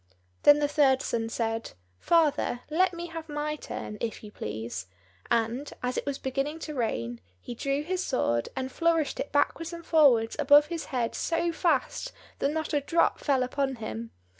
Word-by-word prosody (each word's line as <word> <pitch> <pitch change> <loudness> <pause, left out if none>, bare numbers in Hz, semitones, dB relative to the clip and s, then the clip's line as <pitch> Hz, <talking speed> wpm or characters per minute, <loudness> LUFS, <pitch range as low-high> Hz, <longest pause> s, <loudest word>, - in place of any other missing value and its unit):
Then 290 0 +8
the 295 0 +1
third 280 -3 +3
son 225 -1 -1
said, 225 -1 -2 0.3
"Father, 300 -7 +2
let 365 +4 +3
me 340 -1 -6
have 330 -1 -7
my 300 +1 -2
turn, 210 -7 -7
if 230 -1 -3
you 210 - -9
please;" 105 - -5 0.4
and, 235 +5 0
as 250 0 -1
it - - -3
was 280 -1 -1
beginning 275 +4 -2
to 305 - -5
rain, 120 - -2 0.2
he 240 - -7
drew 275 +4 -1
his 370 +3 -2
sword, 120 - 0
and 260 0 -3
flourished 330 -1 +1
it - - -3
backwards 320 +4 +1
and 335 -1 -8
forwards 255 -9 +4
above 290 +1 +7
his 325 -3 -4
head 240 -3 -1
so 340 +1 0
fast 330 - 0 0.3
that 275 - +2
not 315 +1 -3
a 290 - +2
drop 335 +4 +2
fell 270 -3 +2
upon 270 +1 -1
him. 115 - -6
280 Hz, 180 wpm, -28 LUFS, 235-315 Hz, 0.4 s, Then